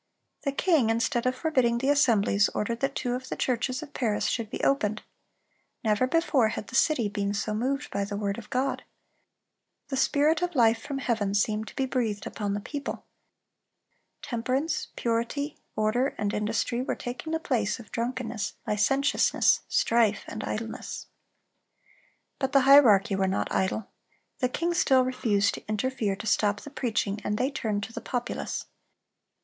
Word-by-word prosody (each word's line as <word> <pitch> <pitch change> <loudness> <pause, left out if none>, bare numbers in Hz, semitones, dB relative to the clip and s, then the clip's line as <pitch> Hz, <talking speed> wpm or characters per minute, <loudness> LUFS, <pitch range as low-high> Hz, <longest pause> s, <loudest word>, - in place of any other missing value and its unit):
The 280 - +1
king, 280 -5 +2
instead 230 +2 +1
of 255 - +1
forbidding 255 -7 +1
the 265 +3 0
assemblies, 215 -7 +3
ordered 230 +2 -1
that 275 +1 -1
two 245 - -1
of 255 +1 -5
the - - -2
churches 255 +2 -1
of 290 - -12
Paris 220 -5 0
should 230 -3 -1
be - - -5
opened. 215 -6 +1 0.8
Never 220 +3 +2
before 290 -5 +3
had 220 -1 -5
the 260 - -7
city 265 -6 +3
been 200 0 -2
so 215 +1 -2
moved 265 +6 -2
by 200 - -1
the 200 0 -4
word 200 0 -2
of 215 - -12
God. 265 +1 -1 1.1
The 270 - -2
spirit 300 +5 +3
of 355 -2 -1
life 230 -3 +4
from 280 - -4
heaven 220 -7 -1
seemed 215 +1 +1
to - - -11
be 270 - 0
breathed 225 -6 -1
upon 205 -2 -3
the - - -2
people. 285 +7 -5 1.2
Temperance, 260 +5 -1
purity, 235 +6 -2 0.2
order, 220 +5 +1
and 205 0 -1
industry 225 +3 -1
were 260 - -2
taking 245 +6 -6
the 320 - 0
place 245 -10 -1
of 215 - -13
drunkenness, 235 -3 -3
licentiousness, 270 +7 +3
strife, 230 -3 +2
and 215 - -6
idleness. 225 +1 -5 1.3
But 265 0 -1
the 275 - +6
hierarchy 240 -8 +6
were 190 0 +1
not 190 - -1
idle. 190 +2 0 0.5
The 250 - +1
king 340 +6 -1
still 265 -6 +4
refused 230 -6 +1
to - - -9
interfere 215 -1 -1
to 210 - -8
stop 205 -1 +2
the 290 - -10
preaching, 220 -6 -1
and 210 - -1
they 260 +5 0
turned 215 -7 -2
to 225 - -7
the 230 - -5
populace. 245 +1 -3
235 Hz, 165 wpm, -27 LUFS, 210-270 Hz, 1.3 s, the